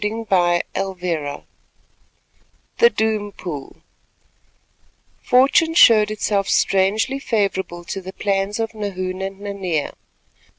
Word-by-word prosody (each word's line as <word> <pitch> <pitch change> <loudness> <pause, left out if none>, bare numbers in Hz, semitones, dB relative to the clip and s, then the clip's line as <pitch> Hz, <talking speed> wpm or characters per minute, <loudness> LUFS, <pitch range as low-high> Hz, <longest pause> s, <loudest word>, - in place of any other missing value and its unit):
CHAPTER 195 -6 +1 0.3
V 160 -6 -4 1.4
THE 470 - +7
DOOM 215 - -1
POOL 150 -8 -8 1.4
Fortune 280 +6 +3
showed 215 -9 +6
itself 205 -2 -1
strangely 210 +8 +1
favourable 195 -8 -2
to 190 +3 -5
the 190 +1 -8
plans 200 +1 -1
of 225 0 -2
Nahoon 185 -3 -4
and 195 0 -5
Nanea. 190 -7 -3
200 Hz, 95 wpm, -20 LUFS, 185-220 Hz, 1.4 s, THE